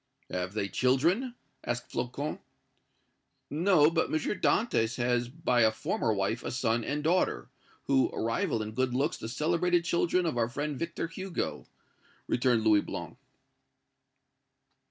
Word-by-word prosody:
"Have 90 +1 -3
they 100 -2 0
children?" 170 - +1 0.3
asked 120 - -4
Flocon. 140 +5 -3 1.1
"No; 160 0 +4
but 165 -1 +1
M. - - -4
Dantès 155 - +1
has 120 0 +1
by 125 -4 +1
a 110 -1 +5
former 110 +1 -1
wife 105 +3 -1
a - - -3
son 115 -2 0
and 145 +5 -2
daughter, 165 - +1 0.3
who 135 -1 +3
rival 115 -1 -1
in 105 - -6
good 125 +2 -1
looks 135 +3 0
the 110 - -6
celebrated 170 +6 +1
children 175 +1 +1
of 150 -8 -1
our 115 0 +1
friend 145 +3 -3
Victor 170 0 -3
Hugo," 185 +2 -4 0.6
returned 120 -3 +2
Louis 105 -2 +5
Blanc. - - -6
130 Hz, 135 wpm, -29 LUFS, 115-165 Hz, 1.1 s, a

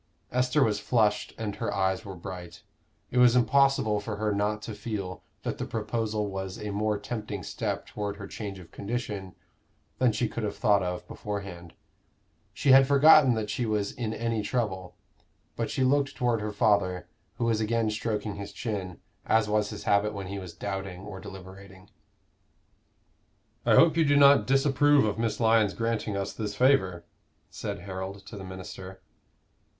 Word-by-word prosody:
Esther 125 +3 +2
was 105 -3 +1
flushed 105 -2 +1
and 105 -3 -4
her - - -2
eyes 95 -1 0
were 95 -1 -8
bright. 90 -1 -9 0.5
It 125 - +1
was 125 -1 +6
impossible 125 -3 +3
for 105 +1 -5
her 105 0 -1
not 105 +1 -1
to 110 - -5
feel 100 -4 -5 0.2
that - - -3
the - - -2
proposal 110 -1 -2
was 95 -1 -5
a 105 -1 -5
more 105 +1 0
tempting 105 -2 -5
step - - -3
toward 100 -1 -4
her 100 - -7
change 100 -1 -6
of 85 -2 -13
condition 105 -4 -5 0.6
than 125 -2 +4
she 110 +2 0
could 120 - -5
have 105 -2 -3
thought 100 -2 +3
of 90 0 -4
beforehand. 100 -5 -6 0.8
She 140 - +2
had 135 0 +8
forgotten 140 -2 +7
that 110 -2 -2
she 120 - -1
was 105 -2 0
in 115 -3 -4
any 115 0 -1
trouble. 100 -4 -2 0.6
But - - -2
she 130 - 0
looked 140 +2 +2
toward 120 -3 +1
her 105 0 -3
father, 100 -4 +1 0.3
who 115 - -1
was 115 -2 +1
again 110 0 +1
stroking 105 -2 -3
his 100 0 -6
chin, 95 -6 -4 0.3
as 110 -1 +3
was 105 0 +1
his - - -7
habit 105 +1 +2
when 100 -1 -5
he 100 +2 -5
was 90 -3 -9
doubting 95 -1 -5
or 95 -1 -8
deliberating. 95 -1 -12 1.8
"I - - +6
hope 165 -1 +6
you 165 - +4
do 145 -1 +3
not 140 0 +6
disapprove 135 0 +4
of 105 +1 -2
Miss 110 -2 -1
Lyon's 110 -3 +3
granting 115 -3 -1
us 100 - -3
this 105 -2 -4
favor?" 95 -9 +2 0.5
said - - -5
Harold 95 +1 -6
to 105 - -10
the 100 - -7
minister. 95 0 -9
105 Hz, 170 wpm, -28 LUFS, 95-115 Hz, 1.8 s, had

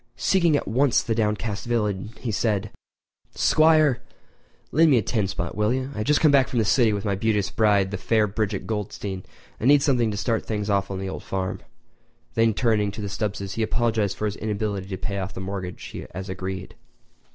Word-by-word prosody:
Seeking 170 -6 +3
at - - -4
once 125 +5 +3
the 115 - -1
downcast 105 0 -1
villain, 105 -4 -1
he 120 - -3
said: 105 -1 0 0.6
"Squire—lend 155 +1 +2
me 135 - +5
a 110 - +2
ten 105 -1 0
spot, 85 -2 -4
will 105 +1 +1
you? 130 +1 -2
I - - -6
have 105 - -2
just 150 0 +4
come 155 -2 +5
back 135 -2 +5
from 125 - -3
the 110 - +3
city 115 +1 +4
with 100 0 -2
my 100 - +1
beauteous 105 0 0
bride, 100 -3 +3
the 100 - -4
fair 110 +3 +2
Bridget 105 0 -2
Goldstein, 105 -3 -4 0.4
and 115 - 0
need 145 0 +6
something 125 -6 +2
to 105 - -3
start 110 +3 0
things 105 -1 -2
on 100 -1 0
the 95 0 -4
old - - -6
farm." 95 -1 -3 0.7
Then 115 -2 +3
turning 110 -4 +2
to 105 - -6
the 100 - -4
Stubbses, 100 -1 -3
he 115 - -3
apologised 110 -3 0
for 110 - -2
his 105 -1 -2
inability 105 -2 -3
to 95 -1 -4
pay 100 +1 -3
off 95 0 -5
the - - -5
mortgage 95 -1 -6 0.2
as 95 +1 -5
agreed. 95 0 -5
105 Hz, 200 wpm, -24 LUFS, 100-115 Hz, 0.7 s, need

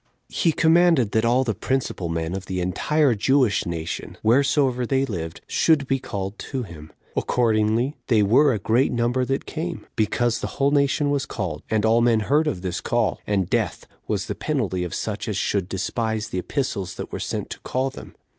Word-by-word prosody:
He 165 - +2
commanded 160 - +4
that 110 +1 +2
all 125 +3 +3
the 115 -4 -1
principal 120 -6 -2
men 80 +1 -2
of 95 0 -5
the 95 -1 -2
entire 135 - +2
Jewish 125 -1 +2
nation, 85 -1 -5
wheresoever 130 +2 +3
they 135 +2 +1
lived, 85 -9 -5
should 155 -4 +2
be 135 0 0
called 100 -2 -5
to 130 -2 -4
him. 80 -6 -11 0.2
Accordingly, 115 +3 +1
they 110 -4 +4
were 135 +8 +5
a 115 - 0
great 115 +7 +2
number 120 +1 +1
that 135 +2 -2
came, 165 +2 -5
because 115 +2 +1
the - - -6
whole 140 +1 +3
nation 145 0 +2
was 140 -1 0
called, 90 -9 -4
and 110 -1 +1
all 115 +1 +4
men 115 -2 +3
heard 150 +8 +2
of 90 -11 -2
this 90 0 -3
call, 120 -3 0
and 100 -4 +1
death - - -1 0.2
was - - -1
the - - -3
penalty 105 - -1
of 90 - -4
such 110 -1 -3
as 105 -3 -2
should 100 -3 0
despise 110 +3 -2
the 90 - -2
epistles 100 - -3
that - - -7
were - - -4
sent - - -4
to - - -6
call 130 +1 -2
them. - - -11
115 Hz, 195 wpm, -23 LUFS, 100-135 Hz, 0.2 s, were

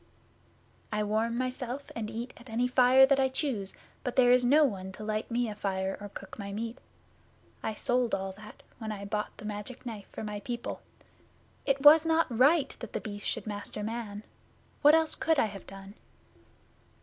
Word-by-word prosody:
'I 210 0 0
warm 220 +3 0
myself 255 +1 -4
and 220 -2 -3
eat 230 +3 -5
at 240 +1 -14
any 235 +3 +1
fire 255 +1 +6
that 275 0 +3
I 265 0 +3
choose, 255 -8 -2 0.3
but 250 - -3
there 245 -2 +6
is 250 0 +5
no 290 +5 +6
one 190 -8 -1
to 215 - -9
light 215 0 -2
me 240 0 0
a 215 - -4
fire 195 -2 -2
or 205 - -6
cook 205 - -10
my 200 -1 -5
meat. 225 +4 -4 0.8
I 220 - -3
sold 245 +1 +1
all 190 0 -4
that 210 +2 -13 0.2
when 220 -2 -4
I 200 -1 -6
bought 210 +1 -3
the 215 - -10
Magic 210 +5 -6
Knife 215 -5 -6
for - - -7
my 210 -1 -4
people. 240 +2 -5 0.9
It 275 -1 +2
was 300 +2 +9
not 325 0 +3
right 280 +6 +4
that - - -8
The - - -1
Beast 205 -1 -5
should - - -2
master 210 0 -5
man. 215 -2 -5 0.6
What 295 +2 +8
else 320 -1 +2
could 320 -1 +1
I - - +4
have 200 -2 -8
done? 195 0 -10
230 Hz, 190 wpm, -30 LUFS, 210-255 Hz, 0.9 s, was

